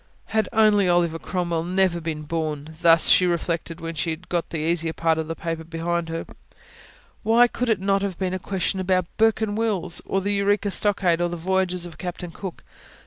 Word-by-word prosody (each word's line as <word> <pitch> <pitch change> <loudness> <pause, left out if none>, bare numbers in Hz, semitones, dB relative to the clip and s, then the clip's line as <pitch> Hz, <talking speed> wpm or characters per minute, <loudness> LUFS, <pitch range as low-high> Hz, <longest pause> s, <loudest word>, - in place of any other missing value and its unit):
Had 220 -3 +1
only 210 -4 +4
Oliver 170 -2 +2
Cromwell 170 -2 -2
never 180 0 +1
been 155 -2 -4
born! 155 -1 -4
thus 165 -1 +6
she 180 - +6
reflected, 170 -1 -2
when 165 0 -5
she 165 +2 -2
had 160 +3 -6
got 175 -2 -1
the 165 - -4
easier 165 +1 0
part 160 -1 +1
of 160 - -3
the 165 - -4
paper 165 -1 -4
behind 165 +1 -2
her. 165 0 -4 1.0
Why 235 +2 +5
could 250 0 -3
it 220 -4 +2
not 195 +1 +1
have 195 -3 -3
been 185 -1 -2
a 185 - -2
question 190 +1 -1
about 185 -1 +1
Bourke 225 0 +3
and 210 -2 -1
Wills, 195 -6 -1
or 195 - -1
the 200 +2 -1
Eureka 205 0 +1
Stockade, 190 -5 +1
or 175 - +1
the 175 - -4
voyages 180 0 0
of 170 -2 -11
Captain 180 -1 -5
Cook? 185 +1 -8
175 Hz, 200 wpm, -24 LUFS, 165-195 Hz, 1.0 s, thus